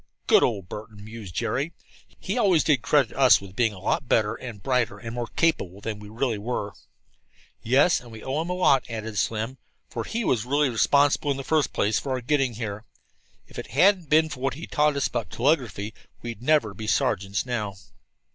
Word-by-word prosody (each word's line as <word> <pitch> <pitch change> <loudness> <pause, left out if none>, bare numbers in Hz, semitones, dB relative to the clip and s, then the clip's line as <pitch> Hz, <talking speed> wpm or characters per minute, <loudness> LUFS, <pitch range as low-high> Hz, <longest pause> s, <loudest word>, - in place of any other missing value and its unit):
"Good - - +5
old 100 -6 0
Burton!" 105 0 -9
mused 110 -5 -9
Jerry. 140 - -1 0.5
"He - - -3
always 195 -9 +3
did 145 -7 +2
credit 140 -4 +2
us 130 -1 +6
with 95 -1 -12
being 115 -1 +2
a 105 - -11
lot 100 +7 -1
better 110 -1 +3
and 115 -4 -9
brighter 125 -6 0
and 115 +1 -7
more 120 -1 -3
capable 100 - +1
than 105 0 -5
we 105 0 -11
really 115 0 -1
were." 105 -2 -3 0.9
"Yes, 135 +9 +4
and 120 - -13
we 110 -1 -10
owe 135 +4 -1
him 170 - -5
a - - 0
lot," 140 -8 +3
added 110 -2 -4
Slim, 115 +4 -2 0.3
"for - - -3
he 230 +1 -3
was 120 -9 +1
really 140 +2 +1
responsible 145 +5 +3
in 140 - 0
the 135 - -5
first 155 0 +1
place 105 +2 +1
for 135 - -3
our 130 - -2
getting 135 -1 +1
here. 105 -2 -5 0.6
If - - -9
it - - -6
hadn't 180 - +3
been 155 +1 +4
for 140 -3 -7
what 135 +1 -1
he 160 - -7
taught 150 0 +1
us 140 - 0
about 120 -3 -2
telegraphy 120 -6 0 0.3
we'd 120 -1 -6
never 130 -6 +2
be 110 +2 -7
sergeants 100 -2 0
now." 110 -5 -3
120 Hz, 205 wpm, -25 LUFS, 110-145 Hz, 0.9 s, us